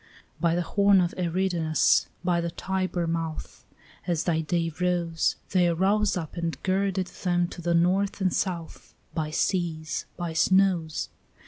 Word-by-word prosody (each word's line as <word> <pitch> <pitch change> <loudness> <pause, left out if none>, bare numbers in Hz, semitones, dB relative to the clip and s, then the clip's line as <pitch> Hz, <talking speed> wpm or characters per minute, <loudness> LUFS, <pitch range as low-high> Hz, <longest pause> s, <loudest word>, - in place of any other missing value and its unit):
By 170 -1 +2
the 175 - 0
horn 200 +2 +4
of 175 -1 +1
Eridanus, 175 -2 +2 0.2
by 175 -1 +1
the 170 - -2
Tiber 185 0 -2
mouth, 165 -1 -4 0.4
As 170 -3 0
thy 160 -2 +1
day 165 +1 -1
rose, 175 -2 +1 0.2
They 180 -2 +4
arose 195 +5 +2
up 160 -4 -5
and 170 -1 -2
girded 190 0 0 0.2
them 175 -1 +1
to 175 - -9
the 170 0 +1
north 190 +4 +2
and 185 -2 +1
south, 170 -4 -4 0.2
By 155 -2 -2
seas, 160 -1 -1
by 175 -2 -3
snows. 180 -2 +2
175 Hz, 145 wpm, -26 LUFS, 165-185 Hz, 0.4 s, horn